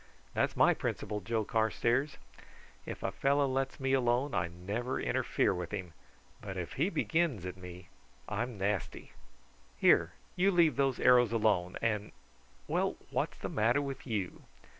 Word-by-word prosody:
That's - - 0
my - - +6
principle, 105 - -3
Joe 110 +2 -1
Carstairs; 120 +6 +1 0.7
if - - -6
a - - 0
fellow 140 +1 +2
lets 135 0 -2
me 135 0 0
alone 125 +1 +2
I 85 - +1
never 100 +9 -3
interfere - - +1
with 90 -1 -4
him, 95 -5 -5 0.5
but 95 -2 -6
if 90 -2 -4
he 160 +8 +1
begins 160 - 0
at 90 0 -5
me 90 -1 -10 0.4
I'm 115 +2 -3
nasty. 100 -2 -2 0.7
Here, - - +4 0.2
you 185 +2 +3
leave 170 -5 +4
those 135 -2 +1
arrows 125 -2 +5
alone, 105 -6 +1
and 105 -2 -1 0.5
well, - - 0 0.2
what's - - -1
the - - -4
matter 115 +5 +2
with 140 -1 -5
you?" 100 -6 -3
115 Hz, 150 wpm, -32 LUFS, 100-135 Hz, 0.7 s, my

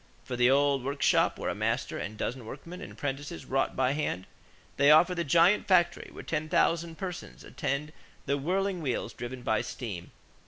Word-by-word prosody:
For 125 - -5
the 125 +1 +4
old 140 -1 +3
workshop 140 +1 +2
where - - -2
a - - -2
master - - -1
and 105 - -5
a - - -15
dozen 125 +3 -3
workmen 165 +8 -8
and - - -8
apprentices 145 +4 -5
wrought 135 +1 0
by 130 0 +2
hand, 140 -11 -2 0.5
they 140 +1 +5
offer 165 +4 +7
the 170 -1 -1
giant 170 +7 +4
factory 175 -2 +3
where - - -9
ten 155 +1 -2
thousand 170 -1 +1
persons 180 - -6
attend 150 +3 -3 0.3
the 140 - +1
whirling 185 +4 0
wheels 125 -5 -2
driven 120 +1 -7
by 110 -2 +1
steam. 100 -9 -6
145 Hz, 185 wpm, -29 LUFS, 130-170 Hz, 0.5 s, offer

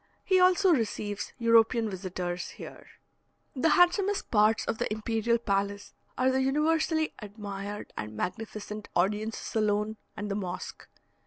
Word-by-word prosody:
He 375 -1 +3
also 370 +1 +5
receives 210 -5 -2
European 230 -1 +4
visitors 180 -2 -4
here. - - -10 0.7
The 300 +5 +2
handsomest 380 +4 +3
parts 215 0 +4
of 220 - -2
the - - -1
imperial 225 +2 0
palace 200 -2 -2 0.2
are 260 +1 +3
the 265 0 +1
universally 315 +3 +1
admired 205 -1 -7
and 105 0 -6
magnificent 215 - -5
audience 210 +5 +1
saloon 215 0 -1 0.2
and 205 -1 -4
the - - +1
mosque. 185 -3 -5
215 Hz, 130 wpm, -29 LUFS, 205-260 Hz, 0.7 s, also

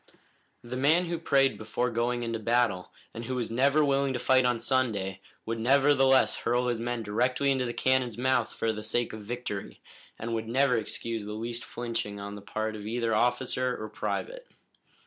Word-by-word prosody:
The 120 +1 -6
man 155 +7 +3
who 170 -1 -3
prayed 135 -6 +2
before 110 +3 -1
going 120 +1 0
into 115 -1 -2
battle, 115 -4 +1 0.2
and 115 +1 -6
who 130 - -3
was 120 -3 -2
never 140 +5 +3
willing 140 -1 +1
to - - -1
fight 130 +1 +4
on 120 -2 +1
Sunday, 110 -7 0 0.2
would 115 0 -3
nevertheless 135 +1 +4
hurl 125 +1 0
his 120 -2 -1
men 120 0 -2
directly 125 +6 +1
into 130 -2 +1
the 120 - -2
cannon's 130 -3 +1
mouth 125 -2 +1
for 110 -1 -1
the 110 - -6
sake 120 +2 -1
of 110 - -7
victory, 105 -2 -5 0.4
and 115 +1 -4
would 110 0 -2
never 130 +2 +3
excuse 115 0 -3
the 105 - -5
least 115 +2 -4
flinching 115 -4 -4
on 100 0 -6
the 105 - -8
part 110 +2 -3
of 105 0 -7
either 115 0 0
officer 125 +2 +1
or 110 - -5
private. - - -4
120 Hz, 185 wpm, -28 LUFS, 110-130 Hz, 0.4 s, fight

